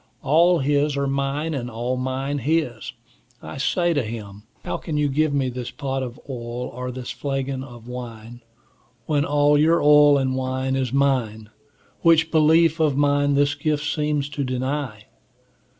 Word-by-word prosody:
All 170 Hz, +5 st, +4 dB
his 145 Hz, 0 st, +1 dB
are 140 Hz, -, 0 dB
mine, 140 Hz, +3 st, -1 dB, 0.2 s
all 120 Hz, +2 st, -3 dB
mine 130 Hz, +2 st, -2 dB
his. 135 Hz, -5 st, -1 dB, 0.5 s
I -, -, -9 dB
say 175 Hz, +5 st, +1 dB
to 145 Hz, -, +1 dB
him, 105 Hz, -3 st, -7 dB, 0.2 s
How -, -, -2 dB
can 155 Hz, -3 st, -4 dB
you 150 Hz, -1 st, +2 dB
give 150 Hz, +2 st, +1 dB
me 140 Hz, -2 st, 0 dB
this 125 Hz, -1 st, -5 dB
pot 135 Hz, +1 st, -4 dB
of 125 Hz, -2 st, -6 dB
oil, 120 Hz, -2 st, -5 dB
or 125 Hz, +1 st, -5 dB
this 125 Hz, -1 st, -6 dB
flagon 135 Hz, -1 st, -3 dB
of 120 Hz, -3 st, -12 dB
wine, 120 Hz, -1 st, -8 dB, 0.6 s
when 145 Hz, -2 st, +1 dB
all 145 Hz, 0 st, +3 dB
your 165 Hz, +3 st, +4 dB
oil 145 Hz, -1 st, +6 dB
and 130 Hz, -1 st, 0 dB
wine 130 Hz, 0 st, -2 dB
is 130 Hz, -3 st, -1 dB
mine, 120 Hz, -6 st, 0 dB, 0.5 s
which 165 Hz, -1 st, +4 dB
belief 160 Hz, +1 st, +4 dB
of 150 Hz, -4 st, +2 dB
mine 145 Hz, 0 st, +2 dB
this 140 Hz, 0 st, +2 dB
gift 150 Hz, -2 st, -1 dB
seems 150 Hz, -2 st, -1 dB
to 145 Hz, -1 st, -3 dB
deny? 130 Hz, -3 st, -3 dB
140 Hz, 160 wpm, -23 LUFS, 125-150 Hz, 0.6 s, oil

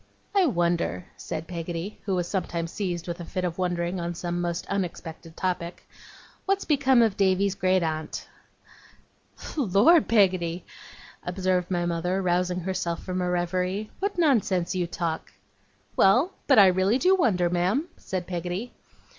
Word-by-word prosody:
'I 390 Hz, -4 st, +4 dB
wonder,' 170 Hz, -, 0 dB
said 155 Hz, -, -5 dB
Peggotty, 170 Hz, +3 st, -5 dB
who 195 Hz, -2 st, 0 dB
was 175 Hz, -1 st, -1 dB
sometimes 170 Hz, -3 st, -2 dB
seized 180 Hz, -4 st, -3 dB
with 170 Hz, 0 st, -4 dB
a -, -, -5 dB
fit 180 Hz, +2 st, -4 dB
of 175 Hz, 0 st, -4 dB
wondering 175 Hz, 0 st, -1 dB
on 170 Hz, 0 st, -3 dB
some 175 Hz, +1 st, -3 dB
most 175 Hz, 0 st, -2 dB
unexpected 170 Hz, -4 st, -5 dB
topic, 175 Hz, -2 st, -3 dB, 0.6 s
'what's 390 Hz, 0 st, +1 dB
become 265 Hz, -5 st, +4 dB
of 220 Hz, -4 st, +1 dB
Davy's 195 Hz, 0 st, +2 dB
great 185 Hz, -1 st, +2 dB
aunt?' 155 Hz, -1 st, -3 dB, 1.3 s
'Lor, 265 Hz, -, +5 dB
Peggotty!' 185 Hz, -5 st, +2 dB, 0.6 s
observed 180 Hz, 0 st, 0 dB
my 175 Hz, -2 st, 0 dB
mother, 175 Hz, +2 st, -1 dB
rousing 180 Hz, 0 st, 0 dB
herself 175 Hz, -2 st, -3 dB
from 185 Hz, 0 st, -2 dB
a 180 Hz, -, 0 dB
reverie, 180 Hz, +4 st, -1 dB
'what 400 Hz, 0 st, -2 dB
nonsense 210 Hz, -, +2 dB
you 180 Hz, -2 st, -1 dB
talk!' 165 Hz, -1 st, -4 dB, 0.6 s
'Well, 245 Hz, -, +4 dB, 0.2 s
but 275 Hz, -, +5 dB
I 200 Hz, -, +9 dB
really 190 Hz, +5 st, +3 dB
do 365 Hz, +7 st, +4 dB
wonder, 190 Hz, -, +2 dB
ma'am,' 180 Hz, -, +1 dB
said 185 Hz, -2 st, -4 dB
Peggotty. 180 Hz, +6 st, -4 dB
180 Hz, 145 wpm, -26 LUFS, 175-200 Hz, 1.3 s, I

